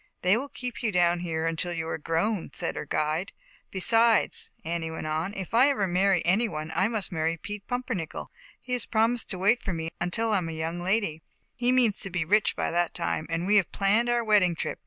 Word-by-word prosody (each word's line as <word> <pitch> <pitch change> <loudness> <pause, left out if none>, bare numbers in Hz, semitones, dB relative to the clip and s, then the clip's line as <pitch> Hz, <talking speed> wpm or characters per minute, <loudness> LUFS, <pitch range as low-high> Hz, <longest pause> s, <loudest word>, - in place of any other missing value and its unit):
" - - -49
They 185 +3 +5
will 270 +5 -3
keep 250 -2 -6
you 230 -3 0
down 175 -2 +3
here 165 -2 -2
until 165 +2 -1
you 165 -1 -3
are 165 - -3
grown," 165 +5 -1
said - - -2
her - - -5
guide. 155 +6 -1 0.2
" - - -32
Besides," 225 +3 +3 0.2
Annie 165 0 -2
went 160 -1 -6
on, 155 +4 -1
"if 190 +1 -6
I 250 +5 +6
ever 255 -8 +1
marry 185 0 +2
any 200 +7 +3
one, 155 -3 -5
I 190 +4 +2
must 215 -5 -3
marry 165 0 -1
Pete 205 +4 -7
Pum 250 0 -2
pernickel. 185 -11 -4 0.3
He 250 - -6
has 245 -3 0
promised 230 +2 +1
to 190 - -3
wait 205 +6 +3
for 190 - -3
me 165 0 -4
until 220 +6 0
I 205 - +3
am 165 -2 -4
a - - -5
young 160 +2 -3
lady, 185 -3 0 0.3
he 245 0 +1
means 245 -5 +3
to 195 - -3
be 175 -3 -2
rich 210 +5 +3
by - - -1
that 175 0 0
time, 165 -2 -2
and 165 +1 -1
we 210 +2 +4
have 195 - +2
planned 210 +5 +2
our 240 0 +2
wedding 205 -6 +3
trip. - - -3
185 Hz, 240 wpm, -27 LUFS, 165-225 Hz, 0.3 s, I